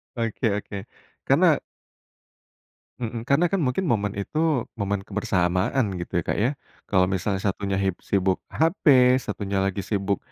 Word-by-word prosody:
Oke 115 -2 -1
oke. 100 -1 -6 0.4
Karena - - +4 1.4
Mhm. 115 -1 -5
Karena 150 +6 +4
kan 185 0 0
mungkin 140 +8 0
momen 105 -7 0
itu 150 +4 0
momen 100 -3 -2
kebersamaan 95 +4 +1 0.2
gitu 85 - -3
ya, 85 - 0
Kak, - - -1
ya. 120 - +3 0.4
Kalau 95 -2 +4
misalnya 95 +1 -1
satunya 100 0 -1
hib 95 -1 +1
sibuk 95 -1 0
HP, 165 +4 0 0.4
satunya 100 -1 -2
lagi 100 0 -1
sibuk 100 -1 0
100 Hz, 140 wpm, -24 LUFS, 95-120 Hz, 1.4 s, Karena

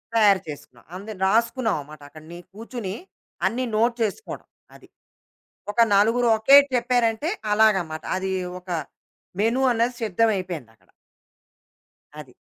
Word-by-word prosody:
తయారు 205 -4 +4
చేసుకున్నా. 135 -5 -10
అంద 200 +4 -9 0.2
రాసుకున్నాం 230 +1 +1
మాట. 155 -1 -13
అక్కడ 155 +1 -14
ని 175 - -9
కూర్చొని, 220 -2 -6 0.5
అన్ని 255 +3 -2
నోట్ 235 +2 +2
చేసుకోవడం. 220 - -5 0.3
అది. - - -17 0.8
ఒక 235 - +2
నలుగురు 230 +4 +3
ఓకే 270 +6 +7 0.2
చెప్పారంటే, 240 +2 +1 0.2
అలాగమాట. 190 -8 +2
అది. 190 0 -3 0.3
ఒక 180 0 -17 0.7
మెను 230 +5 +1
అన్నది 240 +1 0
సిద్ధం 225 +2 +1
అయిపోయిందక్కడ. 125 - -7 1.3
అది. 145 -5 -11
215 Hz, 115 wpm, -23 LUFS, 180-235 Hz, 1.3 s, ఓకే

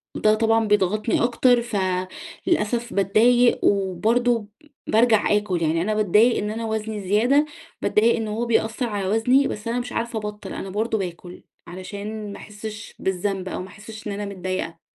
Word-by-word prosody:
ده 215 - +3
طبعًا 225 0 +2
بيضغطني 210 +3 +1
أكتر 245 0 +3
فللأسف 210 - -2
باتضايق 235 +5 +4
وبرضو 215 +4 +1 0.4
بارجع 220 -1 +3
آكل 190 -5 -2
يعني، 165 +1 +1
أنا 215 +4 0
باتضايق 215 +3 +4
إن 210 +1 -2
أنا 225 +1 -4
وزني 220 -1 -3
زيادة، 245 +9 +4 0.4
باتضايق 225 +2 +3
إن 225 -1 -3
هو 220 +3 -2
بيأثر 230 +1 0
على 200 -3 -2
وزني، 245 +7 +3
بس 210 +2 -6
أنا 240 +2 0
مش 245 - -5
عارفة 230 -1 -2
أبطّل، 210 0 -6
أنا 195 - -6
برضو 220 +3 -1
باكل 180 -2 -7 0.2
علشان 200 +4 -6
ما - - -8
أحسش 215 +1 -9
بالذنب 190 0 -2
أو - - -4
ما 185 - -7
أحسش 215 +2 -10
إن 205 - -3
أنا 205 +1 -4
متضايقة. 185 -4 -4
215 Hz, 160 wpm, -23 LUFS, 195-230 Hz, 0.4 s, باتضايق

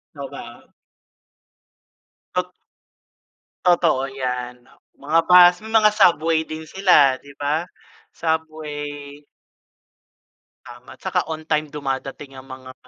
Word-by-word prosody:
Totoo - - -8
ba? - - -11 1.7
Tot - - -1 1.1
Totoo 170 -6 +3
'yan. 125 -2 -4 0.3
Mga 155 +4 0
bus, 180 0 +7
may 220 - -8
mga 215 -1 +6
subway 165 -6 +3
din 155 0 -8
sila, 150 -9 +4
'di 140 +1 -16
ba? 150 +4 -1 0.5
Subway 150 -3 -5 1.4
Tama. 120 +1 -13
Tsaka 180 -3 -2
on 155 0 -6
time 155 -1 -1
dumadating 135 -1 -5
'yang 130 0 -12
mga, 130 0 -10
150 Hz, 105 wpm, -21 LUFS, 135-165 Hz, 1.7 s, bus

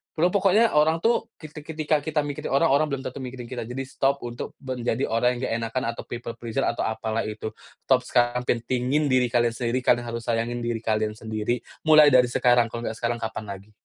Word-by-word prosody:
Pro 175 +3 +2
pokoknya 200 +3 +4
orang 160 +2 +3
tuh 230 -1 +2
ketik 155 -1 -11
ketika 155 -1 +1
kita 150 0 -1
mikirin 145 -1 -5
orang, 140 - +3
orang 150 +2 +3
belum 140 -2 -4
tentu 130 - -6
mikirin 125 -2 -7
kita, 120 -3 -5
jadi 135 +2 -4
stop 135 +1 -1
untuk 120 0 -6
menjadi 125 -1 -2
orang 125 +2 +2
yang 120 - -6
nggak - - -1
enakan 115 +3 -2
atau 115 - -8
people 120 0 -5
pleaser 115 -2 -2
atau 115 - 0
apalah 110 0 -2
itu. 110 0 -5 0.3
Stop 130 -1 +4
sekarang, 120 0 +1
pentingin 130 +4 0
diri 125 -1 +3
kalian 120 0 +2
sendiri, 120 +2 -2
kalian 120 -1 +2
harus 115 0 -4
sayangin 120 +1 -1
diri 120 -1 -2
kalian 110 -1 0
sendiri. 110 +2 -2 0.2
Mulai 155 -1 +7
dari 125 -3 +5
sekarang, 120 -2 +3
kalau 115 0 -4
nggak 110 - -3
sekarang, 120 0 -2
kapan 110 -1 -4 0.2
lagi. 105 +2 -20
125 Hz, 210 wpm, -25 LUFS, 115-140 Hz, 0.3 s, Mulai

